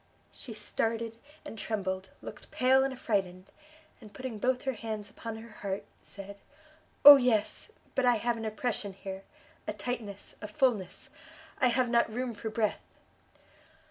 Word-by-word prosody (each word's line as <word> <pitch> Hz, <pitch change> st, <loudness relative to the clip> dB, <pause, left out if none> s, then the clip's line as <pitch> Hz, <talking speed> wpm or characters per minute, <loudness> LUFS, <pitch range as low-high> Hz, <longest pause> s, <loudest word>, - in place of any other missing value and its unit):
She 230 Hz, -5 st, -9 dB
started 225 Hz, +1 st, -2 dB, 0.3 s
and 225 Hz, -7 st, -8 dB
trembled, 190 Hz, -3 st, -2 dB
looked -, -, -9 dB
pale 260 Hz, +1 st, +4 dB
and 270 Hz, -, 0 dB
affrighted, 190 Hz, -7 st, -1 dB, 0.6 s
and 215 Hz, -3 st, -12 dB
putting 255 Hz, -2 st, -6 dB
both 250 Hz, +2 st, +1 dB
her 265 Hz, -, 0 dB
hands 215 Hz, -2 st, -5 dB
upon 225 Hz, -1 st, -6 dB
her 230 Hz, +1 st, -11 dB
heart, 195 Hz, -1 st, -3 dB, 0.2 s
said, 200 Hz, 0 st, -10 dB, 0.7 s
"Oh 290 Hz, -1 st, +14 dB
yes! 240 Hz, -5 st, +1 dB, 0.2 s
but 270 Hz, -, +1 dB
I 245 Hz, -1 st, +5 dB
have 235 Hz, +2 st, 0 dB
an 225 Hz, -1 st, -5 dB
oppression 215 Hz, -2 st, -2 dB
here, 190 Hz, 0 st, -7 dB, 0.5 s
a -, -, -1 dB
tightness, 210 Hz, -1 st, -5 dB
a 210 Hz, -, -5 dB
fulness, 210 Hz, -4 st, 0 dB, 0.5 s
I 255 Hz, -, +5 dB
have 250 Hz, +1 st, +2 dB
not 235 Hz, -1 st, +3 dB
room 245 Hz, +1 st, -2 dB
for 220 Hz, +1 st, -5 dB
breath!" 215 Hz, -1 st, 0 dB
225 Hz, 150 wpm, -30 LUFS, 205-245 Hz, 0.7 s, Oh